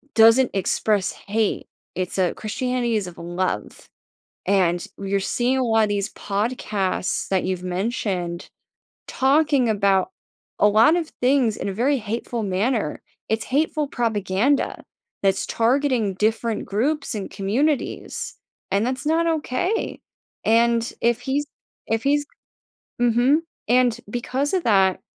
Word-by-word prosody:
doesn't 230 +3 +6
express 200 +1 +1
hate. 215 +1 -2 0.3
It's 185 +1 -3
a 180 -2 +2
Christianity 245 +1 -1
is 200 -3 -3
of 175 - -10
love. 175 - -4 0.6
And 180 -3 +2
you're 195 0 -1
seeing 245 +6 0
a - - +1
lot 225 -1 +3
of - - -1
these 205 0 -2
podcasts 200 -3 -2
that 190 -2 +1
you've 185 -1 -2
mentioned 180 -2 -2 0.6
talking 275 -2 +2
about 200 - +2 0.5
a 210 - +6
lot 225 +10 +5
of 335 -3 -2
things 250 -4 +3
in - - -3
a - - -3
very 265 +8 +2
hateful 230 +2 -3
manner, 205 - 0 0.3
it's 220 0 0
hateful 300 +2 0
propaganda 225 +2 0 0.4
that's 195 -1 +2
targeting 235 -4 +1
different 220 +2 0
groups 275 +9 -1
and 205 -3 -4
communities, 255 +10 -1 0.4
and 200 +2 +2
that's 260 +3 -3
not 330 +2 +2
okay. 330 - -1 0.5
And 230 +1 +3
if 235 +1 +2
he's 275 +3 -1 0.4
if 225 0 0
he's 290 +1 +2 0.8
mhm. 245 +5 +4 0.3
And 245 -1 +4
because 255 - -2
of 360 - 0
that 190 -4 +3
225 Hz, 130 wpm, -23 LUFS, 195-260 Hz, 0.8 s, doesn't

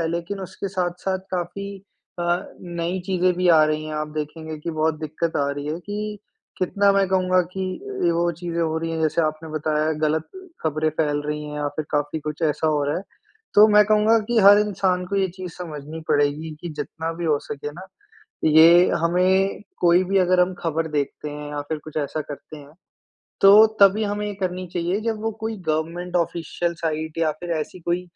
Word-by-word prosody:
है 165 - 0
लेकिन 170 +4 -4
उसके 190 +1 -5
साथ-साथ 185 0 -2
काफ़ी 180 +3 -3 0.5
अ, 175 +1 0
नई 175 +1 -3
चीज़ें 185 -1 +2
भी 180 0 +2
आ 160 -2 +7
रही 155 0 -1
हैं 155 - -5
आप 150 0 -2
देखेंगे 155 +1 -5
कि 170 - -4
बहुत 155 -1 0
दिक्कत 155 +2 -2
आ 140 0 +1
रही 145 +1 -5
है 155 +3 -3
कि, 210 +2 -5 0.4
कितना 200 +2 +2
मैं 195 0 +3
कहूँगा 185 -1 +3
कि 190 - -3 0.4
ए, 170 - +4
वो 170 +1 +1
चीज़ें 170 0 -4
हो 160 0 0
रही 165 0 -3
हैं 160 - -2
जैसे 160 +2 +2
आपने 155 +1 -2
बताया 155 0 0
गलत 155 +1 0 0.4
ख़बरें 155 0 0
फ़ैल 145 -2 +1
रही 150 0 -3
हैं 150 - -7
या 145 -1 -1
फ़िर 155 -1 -3
काफ़ी 145 +1 -1
कुछ 150 +2 -5
ऐसा 155 0 +1
हो 150 -2 +2
रहा 145 - -1
है। 185 - -4 0.5
तो 210 +1 +9
मैं 210 0 +6
कहूँगा 215 +1 +4
कि 240 -1 +2
हर 200 +1 +8
इंसान 190 -3 0
को 200 +2 -2
ये 190 -1 +2
चीज़ 180 -2 -7
समझनी 155 -2 -7
पड़ेगी 145 +2 +1
कि 175 - -5
जितना 160 +1 -5
भी 175 - -5
हो 150 -2 +3
सके 145 +1 -5
ना, 185 +4 -10 0.6
ये 165 +3 +7
हमें 185 +4 +2 0.2
कोई 175 +1 +5
भी 195 +2 +1
अगर 180 0 +3
हम 180 +1 +1
ख़बर 165 0 -1
देखते 150 0 -2
हैं 150 0 -7
या 145 0 -3
फ़िर 155 +2 -4
कुछ 155 0 -7
ऐसा 150 +1 -2
करते 150 +1 -10
हैं, 145 0 -14 0.7
तो 205 +3 +9
तभी 200 +2 +6
हमें 205 0 -2
ये 205 - -4
करनी 185 -1 -3
चाहिए 175 +4 0
जब 225 -2 -2
वो 225 - 0
कोई 220 0 -3
गवर्नमेंट 170 +3 -2
ऑफ़िशियल 170 0 -1
साइट 160 -1 -3
या 160 -2 +2
फ़िर 170 +3 -8
ऐसी 175 +4 -7
कोई 175 +2 -1
170 Hz, 200 wpm, -23 LUFS, 155-185 Hz, 0.7 s, तो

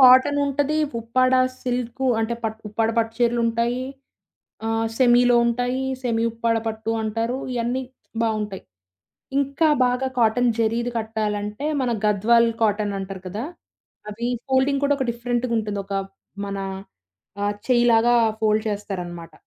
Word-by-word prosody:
కాటనుంటది. 285 +3 +5 0.2
Uppada 255 +3 +2 0.3
silk 250 +1 -2
అంటే, 230 +1 -1
పట్టు 220 0 -3
ఉప్పాడ 220 +2 0
పట్టు 225 0 +1
చీరలుంటాయి, 235 +1 +1 0.8
ఆహ్, 225 0 0
సెమీలో 245 -1 +5
ఉంటాయి, 245 +2 0 0.2
సెమీ 230 -2 0
ఉప్పాడ 230 0 0
పట్టు 220 0 -2
అంటారు 230 +4 -1
ఇయన్నీ 245 +2 -1 0.4
బావుంటాయి. 215 -3 -2 0.8
ఇంకా 280 +3 +2 0.2
బాగా 250 +2 0
కాటన్ 240 +2 +3
జరీది 235 +2 0
కట్టాలంటే 215 +2 -3 0.2
మన 250 - 0 0.2
గద్వాల్ 230 +3 +4
కాటనంటారు 200 -3 -1
కదా! 210 +6 -4 0.7
అవి 235 +3 -3 0.2
ఫోల్డింగ్ 270 +1 +2
కూడా 285 0 +3
ఒక 265 - 0
డిఫరెంట్‌గా 240 0 -2
ఉంటుంది. 210 -2 -2
ఒక 200 - -4 0.5
మన 200 0 -4 0.8
ఆహ్, 205 0 0
చెయ్యిలాగా 240 -1 +4 0.3
ఫోల్డ్ 215 0 +2
చేస్తారనమాట. 180 -5 -5
230 Hz, 115 wpm, -23 LUFS, 215-250 Hz, 0.8 s, కాటనుంటది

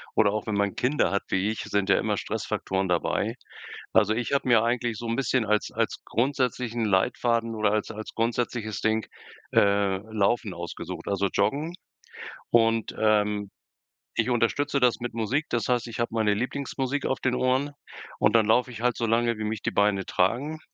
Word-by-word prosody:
oder 100 -2 +4
auch 105 +1 -3
wenn 110 - -1
man 100 -1 0
Kinder 135 +4 +1
hat 100 - 0
wie 95 +2 0
ich, 110 - -5
sind 100 -1 -1
ja 95 - +5
immer - - 0
Stressfaktoren 95 0 -2
dabei. 90 -1 0 0.6
Also, 105 +1 +4
ich 120 +4 -2
habe 140 - +1
mir 115 -2 +6
eigentlich 120 -1 0
so 120 - -7
'n 115 - 0
bisschen 130 -2 +1
als 105 0 0
als - - -2
grundsätzlichen 125 -1 -1
Leitfaden 115 +3 +1
oder 105 -1 +2
als 110 +1 -1
als 110 0 -8
grundsätzliches 115 -2 -2
Ding, 110 0 +1 0.5
äh, 100 -1 +3
laufen 110 -1 +1
ausgesucht, 85 0 -7
also, 100 0 +1
joggen. 145 +12 0 0.8
Und, 115 -1 +2
ähm, 105 -2 +1 0.7
ich - - +2
unterstütze 125 +4 +1
das 125 -2 +2
mit 120 -1 -4
Musik, 115 +6 0
das 120 - -1
heißt, 125 -1 +1
ich 115 +1 -7
habe 120 - +1
meine 110 -2 +2
Lieblingsmusik 135 +4 -2
auf 130 - 0
den 130 -1 0
Ohren 130 +3 +1 0.5
und - - +3
dann 115 -2 +5
laufe 125 +3 +3
ich 115 - -8
halt 125 +1 +1
so 115 - -1
lange, 115 0 +1
wie 110 - -4
mich 110 -1 -3
die - - -1
Beine 100 -2 +2
tragen. 130 +12 0
115 Hz, 180 wpm, -26 LUFS, 105-125 Hz, 0.8 s, mir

